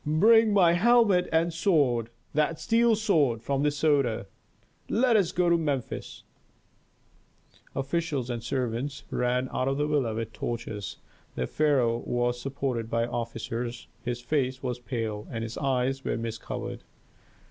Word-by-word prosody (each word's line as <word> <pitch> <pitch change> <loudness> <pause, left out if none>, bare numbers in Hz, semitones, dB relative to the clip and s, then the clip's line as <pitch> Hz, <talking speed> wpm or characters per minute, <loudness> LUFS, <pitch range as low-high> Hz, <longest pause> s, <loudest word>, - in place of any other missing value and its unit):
"Bring 215 +9 +5
my 180 -4 +5
helmet 205 -2 +4
and 165 +1 +2
sword 145 - +2 0.2
that 155 +2 +1
steel 230 0 +3
sword 150 - +2
from 135 +2 0
the 150 - +3
Soda. 140 -7 +1 0.6
Let 240 0 +3
us 195 -6 +3
go 180 0 +1
to 170 0 +4
Memphis 140 -6 -3 0.8
" - - -33
Officials 140 -2 -1
and 120 -1 -3
servants 130 +2 -2
ran 125 +1 0
out 130 - 0
of 135 0 0
the 145 - +1
villa 140 -7 0
with 115 0 -4
torches. 110 -4 -5 0.4
The 65 - -1
pharaoh 130 - +2
was 120 0 -1
supported 130 -4 -3
by 115 0 +1
officers, 115 0 -4 0.2
his 120 0 -3
face 130 0 -1
was 125 -1 -2
pale 115 -4 -4
and 115 -1 -4
his 115 +1 -5
eyes 135 0 0
were - - -1
mist 115 -1 -4
covered. - - -5
135 Hz, 145 wpm, -27 LUFS, 120-160 Hz, 0.8 s, Bring